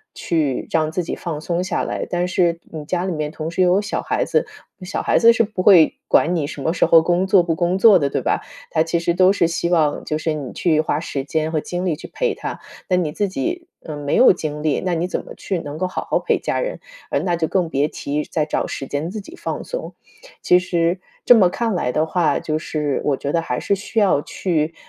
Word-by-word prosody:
去 150 Hz, -6 st, -1 dB
让 155 Hz, -1 st, +1 dB
自 180 Hz, +1 st, -2 dB
己 -, -, -4 dB
放 160 Hz, -4 st, -5 dB
松 175 Hz, +2 st, -1 dB
下 185 Hz, -, -1 dB
来。 -, -, -3 dB
但 175 Hz, 0 st, 0 dB
是 170 Hz, -2 st, +1 dB
你 155 Hz, -2 st, -6 dB
家 180 Hz, +2 st, -1 dB
里 190 Hz, -, -2 dB
面， 150 Hz, -1 st, -2 dB
同 160 Hz, 0 st, -5 dB
时 185 Hz, -, -1 dB
也 180 Hz, -, +5 dB
有 185 Hz, +3 st, +4 dB
小 205 Hz, -, -3 dB
孩 -, -, -1 dB
子， -, -, +1 dB, 0.4 s
小 180 Hz, -, -3 dB
孩 -, -, +2 dB
子 230 Hz, 0 st, +7 dB
是 230 Hz, -, +3 dB
不 205 Hz, -3 st, -4 dB
会 180 Hz, -6 st, +6 dB
管 175 Hz, +2 st, +3 dB
你 145 Hz, -4 st, -1 dB
什 145 Hz, -, -7 dB
么 160 Hz, +4 st, 0 dB
时 -, -, +2 dB
候 165 Hz, -, +6 dB
工 175 Hz, +3 st, +1 dB
作 190 Hz, -2 st, +5 dB
不 165 Hz, -1 st, 0 dB
工 175 Hz, +2 st, 0 dB
作 200 Hz, -2 st, +7 dB
的， 140 Hz, -, 0 dB
对 -, -, -2 dB
吧？ -, -, 0 dB, 0.3 s
他 160 Hz, -, +2 dB
其 165 Hz, +1 st, -1 dB
实 170 Hz, 0 st, 0 dB
都 185 Hz, +2 st, +5 dB
是 170 Hz, -4 st, +2 dB
希 170 Hz, 0 st, -2 dB
望 155 Hz, -4 st, +1 dB
就 155 Hz, -, -1 dB
是 160 Hz, 0 st, -1 dB
你 145 Hz, -4 st, -5 dB
去 155 Hz, -3 st, +2 dB
花 155 Hz, -1 st, -1 dB
时 140 Hz, -4 st, -4 dB
间 155 Hz, +2 st, -1 dB
和 160 Hz, -, 0 dB
精 180 Hz, +1 st, -4 dB
力 170 Hz, -, 0 dB
去 150 Hz, -, -10 dB
陪 -, -, 0 dB
他， -, -, -6 dB, 0.3 s
那 185 Hz, -, +3 dB
你 170 Hz, -4 st, 0 dB
自 205 Hz, +6 st, -1 dB
己， 340 Hz, -, -3 dB, 0.2 s
嗯， 150 Hz, -2 st, -6 dB
没 145 Hz, 0 st, -1 dB
有 255 Hz, -, +7 dB
精 150 Hz, -4 st, -5 dB
力， 155 Hz, -2 st, +1 dB
那 180 Hz, -, 0 dB
你 170 Hz, +2 st, -1 dB
怎 -, -, -3 dB
么 -, -, -10 dB
去 190 Hz, -3 st, -3 dB
能 145 Hz, -1 st, -7 dB
够 185 Hz, +2 st, -1 dB
好 -, -, -5 dB
好 -, -, +2 dB
陪 -, -, 0 dB
家 -, -, -2 dB
人， -, -, -3 dB, 0.3 s
呃， -, -, +2 dB
那 175 Hz, -2 st, 0 dB
就 165 Hz, -1 st, -1 dB
更 180 Hz, -2 st, 0 dB
别 145 Hz, -1 st, +1 dB
提 150 Hz, 0 st, -3 dB
再 155 Hz, -2 st, -1 dB
找 150 Hz, -, -1 dB
时 135 Hz, -, -5 dB
间 145 Hz, +4 st, -3 dB
自 215 Hz, -, -5 dB
己 330 Hz, -, -12 dB
放 -, -, -4 dB
松。 -, -, -6 dB, 0.5 s
其 180 Hz, -, +5 dB
实 175 Hz, 0 st, 0 dB, 0.3 s
这 -, -, +9 dB
么 185 Hz, -5 st, +5 dB
看 230 Hz, +2 st, -1 dB
来 125 Hz, -8 st, 0 dB
的 155 Hz, +4 st, +1 dB
话， 165 Hz, 0 st, +1 dB
就 155 Hz, -1 st, -2 dB
是 150 Hz, -3 st, -2 dB
我 140 Hz, -2 st, +1 dB
觉 140 Hz, -, -3 dB
得 170 Hz, -, +1 dB
还 125 Hz, -6 st, -3 dB
是 200 Hz, -, 0 dB
需 210 Hz, +3 st, -2 dB
要 190 Hz, -8 st, +3 dB
去， 165 Hz, -3 st, -1 dB
170 Hz, 275 characters per minute, -20 LUFS, 155-185 Hz, 0.5 s, 这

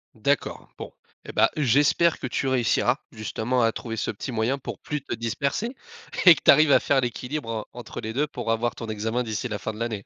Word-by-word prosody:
D'accord. 130 Hz, +5 st, -1 dB
Bon. -, -, -8 dB, 0.3 s
Et, -, -, -8 dB
bah, 110 Hz, +1 st, +4 dB
j'espère 145 Hz, +5 st, +3 dB
que -, -, -4 dB
tu 135 Hz, +2 st, -2 dB
réussiras, 125 Hz, 0 st, +2 dB
justement 115 Hz, +2 st, -2 dB
à 115 Hz, 0 st, +3 dB
trouver 115 Hz, -2 st, -5 dB
ce -, -, -1 dB
petit 110 Hz, +5 st, -6 dB
moyen 115 Hz, +4 st, 0 dB
pour 135 Hz, -, -7 dB
plus 150 Hz, -1 st, -4 dB
te -, -, -4 dB
disperser 140 Hz, -, -2 dB, 0.5 s
et 175 Hz, -3 st, +10 dB
que -, -, -9 dB
tu -, -, +9 dB
arrives 150 Hz, +1 st, +5 dB
à -, -, +7 dB
faire 140 Hz, -2 st, +2 dB
l'équilibre 125 Hz, +2 st, -4 dB
en 110 Hz, -2 st, -3 dB
entre 120 Hz, -, -8 dB
les 110 Hz, -1 st, -5 dB
2 145 Hz, +5 st, 0 dB
pour 130 Hz, -, -6 dB
avoir 115 Hz, +1 st, 0 dB
ton 115 Hz, -, -7 dB
examen 110 Hz, +3 st, -2 dB
d'ici 110 Hz, +2 st, -3 dB
la 105 Hz, -, -3 dB
fin 110 Hz, -, -4 dB
de 105 Hz, -, -10 dB
l'année. 115 Hz, -4 st, -3 dB
120 Hz, 225 wpm, -25 LUFS, 110-140 Hz, 0.5 s, et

